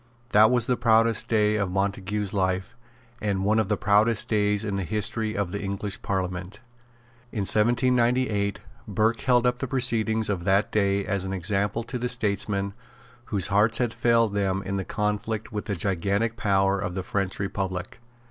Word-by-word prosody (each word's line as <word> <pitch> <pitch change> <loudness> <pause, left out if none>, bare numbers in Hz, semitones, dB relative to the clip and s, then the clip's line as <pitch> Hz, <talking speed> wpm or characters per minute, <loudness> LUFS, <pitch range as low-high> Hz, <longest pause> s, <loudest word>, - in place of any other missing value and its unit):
That 110 +1 +6
was 125 -2 +2
the 125 0 0
proudest 115 -1 +3
day 105 -1 +2
of 100 -3 -1
Montague's 100 +1 -2
life, 95 +2 -1 0.5
and 100 -2 -1
one 110 +2 +3
of 110 -3 0
the 105 - +1
proudest 110 0 +2
days 105 -1 +1
in 100 -2 -2
the 100 - -2
history 110 +4 -2
of 100 -4 -1
the 100 - -4
English 100 0 -3
Parliament. 95 0 -3 0.7
In 105 - -3
1798, 120 -1 +2 0.3
Burke 110 +3 +1
held 125 -2 +3
up 125 0 +1
the 135 - -3
proceedings 110 -4 +1
of 95 -4 -2
that 95 +3 +2
day 100 -1 +1
as 100 -1 -1
an 95 0 -4
example 100 +4 0
to 125 +2 -5
the 125 +1 -1
statesmen 100 -4 0 0.5
whose 100 -7 -1
hearts 110 +2 +3
had 120 -3 0
failed 115 -3 +2
them 100 -1 0
in 100 +1 -3
the 95 - -3
conflict 105 +1 -2
with 105 -1 -4
the 100 - -2
gigantic 100 +5 -1
power 100 -4 +1
of 90 -2 -4
the 95 - -3
French 95 0 -2
republic. 95 -1 -4
105 Hz, 175 wpm, -25 LUFS, 100-115 Hz, 0.7 s, That